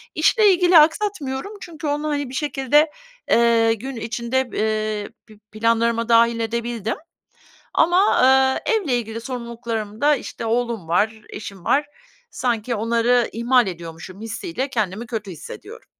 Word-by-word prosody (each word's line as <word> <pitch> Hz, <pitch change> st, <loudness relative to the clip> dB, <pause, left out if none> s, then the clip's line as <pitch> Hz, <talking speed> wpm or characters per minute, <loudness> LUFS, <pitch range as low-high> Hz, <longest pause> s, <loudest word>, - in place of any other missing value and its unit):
İşle 405 Hz, +5 st, +4 dB
ilgili 355 Hz, -1 st, +5 dB
aksatmıyorum 315 Hz, -1 st, 0 dB
çünkü 315 Hz, -3 st, -7 dB
onu, 295 Hz, +1 st, -1 dB
hani, 285 Hz, -3 st, -2 dB
bir 255 Hz, -, -10 dB
şekilde, 295 Hz, +1 st, +2 dB, 0.4 s
eee, 230 Hz, -1 st, +4 dB
gün 255 Hz, +5 st, -6 dB
içinde, 235 Hz, +3 st, -2 dB
eee, 215 Hz, -1 st, -1 dB, 0.2 s
pi 215 Hz, -1 st, -17 dB
planlarıma 230 Hz, +1 st, +1 dB
dâhil 230 Hz, 0 st, +4 dB
edebildim. 230 Hz, -1 st, -2 dB, 0.8 s
Ama, 355 Hz, +5 st, +3 dB, 0.5 s
eee, -, -, +1 dB
evle 335 Hz, -, +1 dB
ilgili 230 Hz, -1 st, -5 dB
sorumluluklarımda, 235 Hz, +1 st, -2 dB
işte, 235 Hz, -, -7 dB
oğlum 230 Hz, -5 st, -1 dB
var, 215 Hz, +6 st, +1 dB
eşim 200 Hz, -3 st, -9 dB
var. 290 Hz, +1 st, +2 dB, 0.5 s
Sanki 235 Hz, -1 st, -1 dB
onları 235 Hz, +2 st, +2 dB
ihmal 240 Hz, 0 st, +3 dB
ediyormuşum 175 Hz, +2 st, -8 dB
hissiyle 265 Hz, -, -4 dB
kendimi 215 Hz, -2 st, -2 dB
kötü 215 Hz, -5 st, -5 dB
hissediyorum. 160 Hz, -, -10 dB
235 Hz, 130 wpm, -21 LUFS, 220-270 Hz, 0.8 s, ilgili